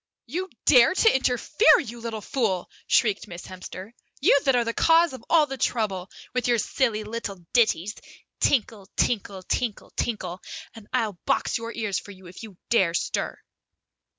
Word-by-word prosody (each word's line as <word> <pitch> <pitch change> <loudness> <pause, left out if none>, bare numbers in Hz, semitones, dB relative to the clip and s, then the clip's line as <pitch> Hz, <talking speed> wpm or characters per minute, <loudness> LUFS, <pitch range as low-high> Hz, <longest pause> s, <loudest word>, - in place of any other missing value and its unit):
"You 355 +10 -4 0.2
dare 250 +5 +6
to 450 -2 +4
interfere, 265 +4 +4
you 235 -2 -7
little 225 -2 -5
fool," 205 -8 -1 0.2
shrieked 215 -2 +2
Miss 175 -3 -9
Hemster. 185 +2 -9 0.3
"You 280 - +5
that 270 -2 +4
are 240 - +3
the 230 - -2
cause 330 +2 +4
of 260 - -9
all 320 -2 +5
the 270 -2 -7
trouble, 195 -6 -1 0.2
with 250 0 0
your 240 -1 +3
silly 220 -1 0
little 210 -5 -6
ditties 215 -5 +2 0.5
tinkle 220 -6 +1
tinkle 200 -5 -1
tinkle 230 +2 -3
tinkle 185 -6 -3 0.3
and 225 -2 -13
I'll 220 -8 -1
box 275 -3 +1
your 230 0 -5
ears 210 -4 -1
for - - -14
you 190 -2 -13
if 175 +1 -11
you 215 -5 -11
dare 185 -8 +3
stir!" - - -2
225 Hz, 165 wpm, -25 LUFS, 195-255 Hz, 0.5 s, dare